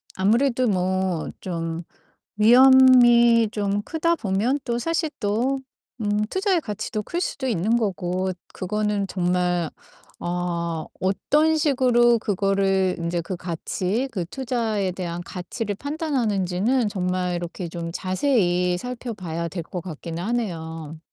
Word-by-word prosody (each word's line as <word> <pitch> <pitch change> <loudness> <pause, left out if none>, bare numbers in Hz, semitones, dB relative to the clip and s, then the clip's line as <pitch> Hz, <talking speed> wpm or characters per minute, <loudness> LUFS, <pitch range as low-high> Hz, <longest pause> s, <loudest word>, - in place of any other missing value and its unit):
아무래도 240 +6 +2
뭐 185 -3 0
좀 165 -2 -4 0.5
위험이 240 -1 +7
좀 205 -1 -1
크다 330 +7 0
보면 220 +4 0
또 235 0 -1
사실 330 +4 0
또 240 +6 0 0.4
음, 210 0 +1
투자의 380 - +1
가치도 215 -3 -4
클 345 - -3
수도 280 -6 -3
있는 220 0 +1
거고 185 -3 -1 0.2
그거는 210 +1 -1
정말 180 -3 0 0.5
어, 170 -2 -2 0.2
어떤 300 +12 +2
식으로 250 -5 +4
그거를 195 -2 +1
인제 170 +1 -1
그 185 +3 -5
가치, 185 +7 -2
그 185 -5 -2
투자에 225 -4 -1
대한 175 -1 -4
가치를 200 +4 -5
판단하는지는 240 - 0
정말 180 -2 -1
이렇게 175 +1 -5
좀 165 0 -5
자세히 185 -3 +1
살펴봐야 190 -8 -5
될 170 +1 -5
것 180 +2 -6
같기는 165 0 -6
하네요. 165 -8 -4
200 Hz, 245 characters per minute, -23 LUFS, 180-240 Hz, 0.5 s, 위험이